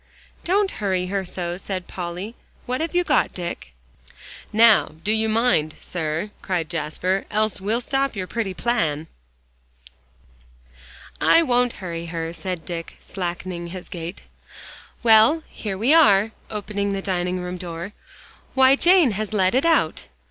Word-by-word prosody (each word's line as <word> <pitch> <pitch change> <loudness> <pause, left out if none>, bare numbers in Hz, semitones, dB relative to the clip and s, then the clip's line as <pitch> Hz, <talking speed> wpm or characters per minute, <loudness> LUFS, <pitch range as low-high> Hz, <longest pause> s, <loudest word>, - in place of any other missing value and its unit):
"Don't 390 +2 +2
hurry 190 -3 0
her 195 -1 0
so," 175 -1 -4
said 190 -1 -5
Polly. 180 +4 -5 0.3
"What 255 +4 -2
have 330 +2 -3
you 355 - +4
got, - - +2
Dick?" 170 - -6 0.8
"Now, 220 -5 +5
do 210 - +1
you 220 0 +2
mind, 215 -9 +2
sir," 165 +3 -3
cried 175 -4 -2
Jasper, 170 +4 -1
"else 215 -1 0
well 215 +4 0
stop 270 0 -1
your 190 -2 -3
pretty 195 -2 -3
plan." 165 -12 0 2.2
"I 335 - +6
won't 245 -4 +2
hurry 170 -1 -5
her," 165 0 -4
said 170 0 -5
Dick, 170 -1 -6
slackening 175 -1 -5
his 180 +1 -8
gait. 170 +1 -7 0.8
"Well, 230 +8 +6
here 200 -3 -5
we 240 +9 +3
are," 215 -9 +5 0.2
opening 205 -1 -2
the 195 0 -3
dining 180 -1 -1
room 180 0 -5
door. 175 +2 -6 0.6
"Why, 265 0 +6
Jane 345 -3 +5
has 215 +1 -3
let 190 -3 +2
it 265 +6 +3
out!" 305 - +1
195 Hz, 140 wpm, -23 LUFS, 175-230 Hz, 2.2 s, I